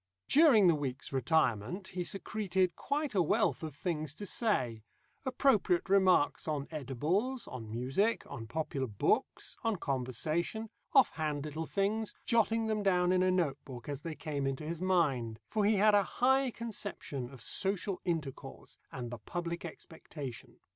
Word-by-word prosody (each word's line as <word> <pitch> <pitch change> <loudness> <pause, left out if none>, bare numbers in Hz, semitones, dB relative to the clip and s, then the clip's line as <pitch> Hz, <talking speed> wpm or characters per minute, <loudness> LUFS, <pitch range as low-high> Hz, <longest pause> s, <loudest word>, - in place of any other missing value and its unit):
During 275 - +7
the 175 - +6
week's 140 -3 -4
retirement 135 - +1
he 180 -1 -3
secreted 190 -1 -1
quite 290 -2 -2
a 190 - +3
wealth 160 - +2
of 155 -4 -6
things 155 -3 -3
to 205 - -6
say 130 - 0 0.5
appropriate 240 -10 +2
remarks 185 -7 +4
on 145 -3 -2
edibles, 160 - -1
on 115 -5 -7
music, 135 - 0
on 115 -1 -7
popular 140 0 -2
books, 120 - 0
on 225 -2 +1
conversation, 155 - -2 0.2
off 270 -3 +6
hand 150 -2 -1
little 155 +1 -4
things, 210 +2 -1
jotting 225 -1 +2
them 215 -1 0
down 180 -2 +3
in 185 0 +3
a 185 - +3
note 165 -7 +1
book 125 -1 -9
as 145 -1 -4
they 160 0 -5
came 145 -4 -3
into 135 +2 -3
his 165 +2 -4
mind, 140 -12 +1
for 215 -2 +2
he 215 +1 +4
had 210 +1 +5
a 205 - +6
high 265 +6 +2
conception 205 - -5
of 135 -2 -12
social 195 -1 -1
intercourse, 150 -6 -5
and 120 -2 -5
the 120 - -6
public 170 - -4
expectation. 155 -5 -8
170 Hz, 155 wpm, -32 LUFS, 140-205 Hz, 0.5 s, During